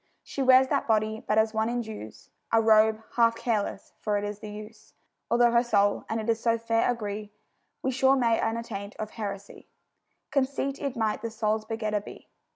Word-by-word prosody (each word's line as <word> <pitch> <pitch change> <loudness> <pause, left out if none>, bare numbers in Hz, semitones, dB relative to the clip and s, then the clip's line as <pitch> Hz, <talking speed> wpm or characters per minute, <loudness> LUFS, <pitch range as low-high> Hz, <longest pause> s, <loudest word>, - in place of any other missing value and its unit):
She 275 - -5
wears 260 0 +6
that 280 - 0
body 220 0 +1
but 215 - +1
as 220 0 +3
one 220 +1 0
indues 215 - -6 0.2
A 225 - +5
robe, 220 0 +4
half 230 -1 +4
careless, 220 -4 -2
for 210 -1 0
it 205 - -2
is 205 0 -4
the 215 - -8
use; 210 +1 -11 0.3
Although 240 0 +4
her 235 0 +4
soul 205 -4 +2
and 225 - -1
it 225 +1 +1
so 230 0 +1
fair 230 0 +1
agree, 210 -3 -5 0.5
We 265 - +1
sure 265 +1 +4
may, 235 -4 +2
unattaint 225 -3 -3
of 215 0 -5
heresy, 200 -2 -7 0.6
Conceit 275 0 -1
it 280 -3 -3
might 220 -2 0
the 230 - -3
soul's 220 -1 -1
begetter 215 -2 -2
be. - - -12
220 Hz, 180 wpm, -27 LUFS, 210-235 Hz, 0.6 s, wears